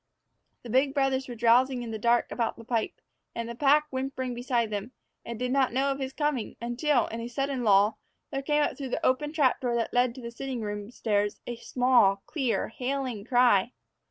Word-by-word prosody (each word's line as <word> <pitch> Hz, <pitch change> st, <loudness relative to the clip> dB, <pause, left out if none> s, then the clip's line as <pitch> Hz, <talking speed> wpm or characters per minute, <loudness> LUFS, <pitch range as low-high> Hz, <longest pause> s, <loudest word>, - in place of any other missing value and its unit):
The 240 Hz, -, -9 dB
big 270 Hz, +3 st, +2 dB
brothers 270 Hz, -1 st, +1 dB
were 245 Hz, -, -6 dB
drowsing 245 Hz, +2 st, +3 dB
in 230 Hz, -, -6 dB
the 220 Hz, -, -4 dB
dark 235 Hz, +2 st, +2 dB
about 230 Hz, -2 st, -1 dB
the 230 Hz, -, -11 dB
pipe, 230 Hz, -1 st, -2 dB, 0.4 s
with 230 Hz, -, -3 dB
the 235 Hz, -, -6 dB
pack 290 Hz, +4 st, +4 dB
whimpering 260 Hz, -1 st, -3 dB
beside 240 Hz, -2 st, -1 dB
them, 210 Hz, +5 st, -4 dB, 0.3 s
and 235 Hz, -1 st, -6 dB
did 250 Hz, +2 st, -2 dB
not 265 Hz, -3 st, +2 dB
know 275 Hz, +2 st, +1 dB
of 275 Hz, -, -3 dB
his 265 Hz, -1 st, -3 dB
coming 295 Hz, -5 st, -2 dB
until, 240 Hz, +2 st, +1 dB
in 230 Hz, +1 st, -5 dB
a 230 Hz, -, -4 dB
sudden 270 Hz, +1 st, -2 dB
lull, 205 Hz, 0 st, +4 dB, 0.3 s
there 270 Hz, -, -2 dB
came 295 Hz, +1 st, +2 dB
up -, -, -1 dB
through 270 Hz, -2 st, -6 dB
the -, -, -2 dB
open 295 Hz, +3 st, +1 dB
trap 290 Hz, -5 st, +2 dB
door 245 Hz, -2 st, 0 dB
that 230 Hz, -1 st, -1 dB
led 245 Hz, -1 st, +2 dB
to 260 Hz, -, -9 dB
the 235 Hz, 0 st, -6 dB
sitting 255 Hz, 0 st, -5 dB
room 205 Hz, -1 st, -5 dB
stairs 210 Hz, -3 st, -1 dB
a 240 Hz, -, -4 dB
small, 235 Hz, -6 st, +3 dB
clear, 270 Hz, -7 st, -1 dB
hailing 255 Hz, -3 st, -3 dB
cry. 245 Hz, -2 st, +3 dB
245 Hz, 210 wpm, -28 LUFS, 230-270 Hz, 0.4 s, pack